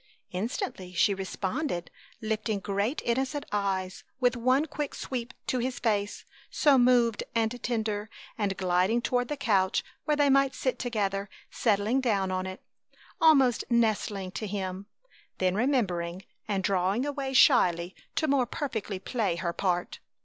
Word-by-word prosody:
Instantly 190 - -4
she 200 +4 +3
responded, 195 - -3 0.3
lifting 215 -1 -1
great 200 +7 -1
innocent 265 +4 -1
eyes, 190 -2 -1 0.2
with 250 -1 +3
one 255 +5 +2
quick 295 -2 -4
sweep, 250 -1 -4
to 255 - 0
his 255 +2 -2
face, 205 -4 -1 0.2
so 290 -2 +4
moved 245 -3 +4
and 230 +1 0
tender; 215 -3 -2 0.3
and 200 -3 -1
gliding 185 +5 +2
toward 245 0 +1
the 295 - -3
couch 195 -8 +2 0.2
where 300 -1 +1
they 290 -1 +4
might 275 -1 +3
sit 260 - -1
together, 200 -4 -1 0.2
settling 220 +4 +1
down 200 -6 +1
on 185 0 -2
it, 185 0 -8 0.6
almost 275 -7 +5
nestling 215 -5 +1
to 215 +3 -4
him, 190 -1 -4 0.5
then 185 -1 +1
remembering 190 -7 0 0.2
and 195 -3 -1
drawing 195 +6 +1
away 280 -2 -3
shyly 185 - +4 0.2
to 315 - +1
more 270 -4 +2
perfectly 220 -8 -3
play 205 -2 -1
her 170 0 -2
part. 180 -1 -1
215 Hz, 140 wpm, -28 LUFS, 190-255 Hz, 0.6 s, almost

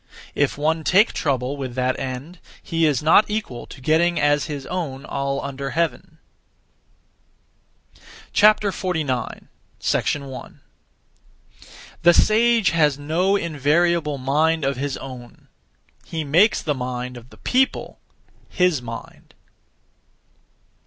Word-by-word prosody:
If 145 -1 0
one 160 +2 0
take 195 +8 +4
trouble 135 -2 -1
(with 130 -3 -5
that 130 0 0
end), 135 +7 -6 0.2
he 165 -1 +1
is 145 -2 0
not 165 +8 +5
equal 210 - -4
to - - -12
getting 160 +5 +2
as 145 -1 +2
his 145 -3 -6
own 155 -7 -4
all 140 0 -2
under 140 0 -5
heaven. 165 +2 -2 2.2
49. 185 - +1
1. 140 -3 -4 1.4
The 175 0 +6
sage 230 0 +4
has 150 -4 +2
no 165 +7 +1
invariable 160 -2 +1
mind 150 +4 +1
of 135 0 0
his 140 +2 -3
own; 125 -3 -11 0.6
he 160 -1 -4
makes 170 +10 +3
the 150 - 0
mind 125 -1 -5
of 120 +1 -12
the - - -17
people 260 +1 0 0.5
his 180 -7 +1
mind. 115 -1 -10
150 Hz, 110 wpm, -22 LUFS, 135-170 Hz, 2.2 s, The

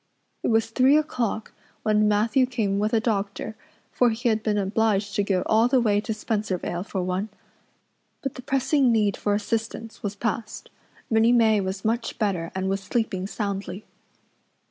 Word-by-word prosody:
It - - -1
was 225 0 +2
three 265 +5 +5
o'clock 240 -8 -2 0.3
when 215 0 +3
Matthew 220 +5 +3
came 210 -6 -1
with 210 +1 +1
a 230 - +3
doctor, 215 -1 -2 0.4
for 245 - +3
he 235 +2 0
had 220 -1 +1
been 215 -1 0
obliged 205 0 +1
to 205 - +1
go 190 -2 0
all 220 +2 +4
the 255 +1 +3
way 210 -3 +2
to 220 - -4
Spencervale 210 -5 -2
for 195 -3 -3
one. 185 +4 -2 0.9
But 270 - -2
the - - -9
pressing 270 0 +2
need 210 -3 +2
for 205 -1 0
assistance 225 +1 -3
was 205 -1 -3
past. 215 +1 -4 0.4
Minnie 225 +1 +4
May 220 -3 +4
was 190 +1 -4
much 230 +1 -1
better 185 -6 -1
and 190 0 -1
was 195 +1 -1
sleeping 195 -2 -2
soundly. 200 -2 -4
215 Hz, 165 wpm, -25 LUFS, 200-230 Hz, 0.9 s, three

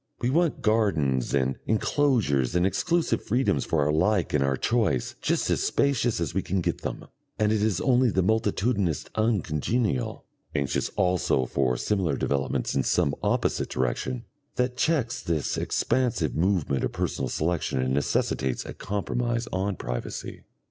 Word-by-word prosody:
We 120 +1 0
want 165 +2 +1
gardens 80 - +1
and 65 -1 0
enclosures 110 - +1
and 90 +1 +3
exclusive 165 - +1
freedoms 115 - +1
for 80 - +1
our 75 - +2
like 90 +4 +1
and 75 -2 +3
our 70 -1 +1
choice, 110 - 0
just - - 0
as - - +1
spacious 125 -6 +1
as 85 -4 -2
we 95 - +1
can 95 +1 -1
get 85 - -2
them - - -5 0.3
and 105 0 +2
it 110 -1 +1
is 105 -4 +1
only 125 -1 +3
the 95 -3 +1
multitudinous 105 - +1
uncongenial, 105 - 0 0.3
anxious 70 -1 0
also 90 -8 +2
for 60 -1 0
similar 95 - 0
developments 70 -2 -1
in 70 - +2
some 70 +2 +1
opposite - - 0
direction, 115 - -2 0.3
that 125 0 0
checks 125 -3 0
this 80 -4 -1
expansive 105 - 0
movement 85 -6 +1
of - - 0
personal - - -2
selection 80 -3 -1
and 65 0 0
necessitates 65 -2 0
a - - -6
compromise 115 +4 -2
on 95 +1 -1
privacy. - - -5
95 Hz, 150 wpm, -26 LUFS, 70-115 Hz, 0.3 s, and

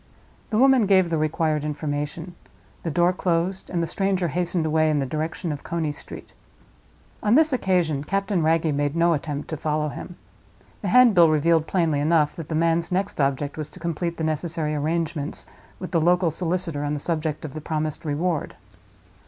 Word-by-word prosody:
The 215 - 0
woman 260 -3 +5
gave 185 -3 +4
the 165 - +1
required 155 -1 0
information, 150 +3 -4 0.5
the 165 - -3
door 175 +3 +2
closed, 180 +1 -1
and 170 -2 -1
the - - +1
stranger 190 +1 0
hastened 175 0 -1
away 155 0 +2
in 150 - +1
the 140 - 0
direction 160 +4 -3
of 145 - -6
Coney 165 -3 -2
Street. - - -11 0.9
On 210 +2 +3
this 315 -1 +4
occasion 175 - +1
Captain 195 +2 0
Wragge 160 -1 +2
made 145 +1 -1
no 170 0 +3
attempt 145 -1 -4
to 155 - -3
follow 150 0 -1
him. 175 +4 -8 0.7
The 200 - -3
handbill 200 -6 +6
revealed 160 +1 +2
plainly 165 -6 +1
enough 150 0 +2
that 165 -3 -7
the 160 - -2
man's 165 +2 +1
next 190 -3 -1
object 140 +2 -1
was 155 -2 -4
to - - -13
complete 170 0 -3
the 160 - -3
necessary 155 0 -1
arrangements 155 0 -2 0.3
with 185 - -7
the 165 - +2
local 175 0 +3
solicitor 165 -2 -2
on 145 0 -1
the - - -3
subject 155 -1 -2
of 140 - -7
the 155 - -6
promised 155 -1 -3
reward. 160 +1 -2
165 Hz, 180 wpm, -24 LUFS, 150-180 Hz, 0.9 s, handbill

